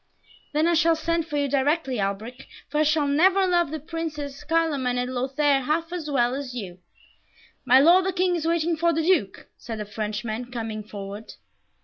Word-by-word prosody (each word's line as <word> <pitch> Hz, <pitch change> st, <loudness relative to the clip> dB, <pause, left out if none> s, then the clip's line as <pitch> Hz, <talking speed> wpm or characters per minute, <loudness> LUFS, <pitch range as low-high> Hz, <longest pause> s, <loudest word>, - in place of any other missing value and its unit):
"Then 305 Hz, +2 st, +2 dB
I 340 Hz, -, +3 dB
shall 330 Hz, 0 st, +4 dB
send 335 Hz, 0 st, -1 dB
for 295 Hz, -, -3 dB
you 285 Hz, -1 st, +1 dB
directly, 275 Hz, -1 st, 0 dB
Alberic, 215 Hz, +6 st, -4 dB, 0.2 s
for 300 Hz, -, -1 dB
I -, -, +4 dB
shall 305 Hz, -1 st, +2 dB
never 370 Hz, +7 st, +4 dB
love 350 Hz, -4 st, +2 dB
the 315 Hz, +1 st, -4 dB
Princes 300 Hz, -3 st, -6 dB
Carloman 295 Hz, -6 st, 0 dB
and 250 Hz, +1 st, -2 dB
Lothaire 270 Hz, +2 st, +1 dB
half 325 Hz, +5 st, -1 dB
as 325 Hz, -4 st, -4 dB
well 245 Hz, -3 st, +2 dB
as 265 Hz, -2 st, -5 dB
you!" 185 Hz, -6 st, -7 dB, 0.9 s
"My 260 Hz, +1 st, +6 dB
Lord 350 Hz, +6 st, +6 dB
the -, -, +1 dB
King 365 Hz, -1 st, +1 dB
is 325 Hz, -1 st, -2 dB
waiting 335 Hz, 0 st, +1 dB
for 335 Hz, +1 st, +1 dB
the 325 Hz, +1 st, 0 dB
Duke," 315 Hz, -, +1 dB
said 225 Hz, -2 st, -6 dB
a 210 Hz, -, -4 dB
Frenchman, 215 Hz, +3 st, -4 dB
coming 225 Hz, -3 st, -4 dB
forward. 205 Hz, +1 st, -8 dB
290 Hz, 190 wpm, -24 LUFS, 245-330 Hz, 0.9 s, My